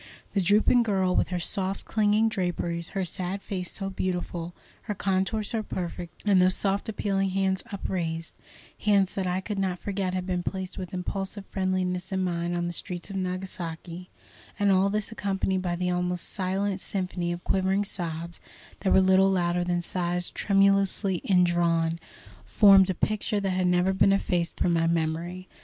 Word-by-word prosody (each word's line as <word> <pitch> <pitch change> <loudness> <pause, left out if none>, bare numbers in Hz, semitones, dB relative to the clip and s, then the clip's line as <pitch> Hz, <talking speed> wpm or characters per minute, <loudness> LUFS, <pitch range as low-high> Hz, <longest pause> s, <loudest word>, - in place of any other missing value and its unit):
The 200 - +2
drooping 210 +6 +4
girl, 190 -5 +1
with - - +2
her 180 - -2
soft, 190 +2 -2
clinging 215 0 +2
draperies, 175 -4 -2
her 190 - 0
sad 185 +3 -3
face 180 -3 -3
so 195 -1 -3
beautiful, 175 -2 -3 0.3
her 210 - 0
contour 195 +3 0
so 220 +2 -1
perfect, 175 -4 -6
and 195 -3 +5
those 185 +1 +4
soft 200 +2 0
appealing 195 -2 0
hands 190 0 +1
upraised, 165 -4 -3 0.5
hands 200 -3 +3
that 190 -2 -2
I 180 +1 0
could 205 0 -4
not 185 -2 0
forget 190 -1 -2
had 185 -1 -2
been 180 -1 -1
placed 190 +1 -4
with 185 -2 -6
impulsive 195 +2 -4
friendliness 185 -1 -1
in 190 -1 0
mine 175 -1 -1
on 175 - -1
the 175 - -3
streets 175 +2 -5
of - - -6
Nagasaki, 180 -2 -5 0.5
and 205 -1 +3
all 190 +1 +4
this 210 +1 -1
accompanied 195 -3 -1
by 175 -1 -1
the 180 +1 -1
almost 180 0 -1
silent 195 +1 -1
symphony 180 -2 -2
of 175 0 -5
quivering 190 +1 +1
sobs 170 -2 -4 0.4
that 190 - 0
were 190 - +6
little 190 +1 +5
louder 175 -2 +1
than 175 0 -1
sighs 175 0 -2
tremulously 195 -1 +2
indrawn, 170 -3 +2 0.4
formed 195 -2 +6
a 190 - 0
picture 210 +2 0
that 195 -1 -1
has 185 0 +1
never 180 +1 +3
been 195 +1 +4
effaced 175 -3 -1
from 175 - +2
my 165 0 +2
memory. 170 +3 -1
185 Hz, 170 wpm, -27 LUFS, 175-195 Hz, 0.5 s, were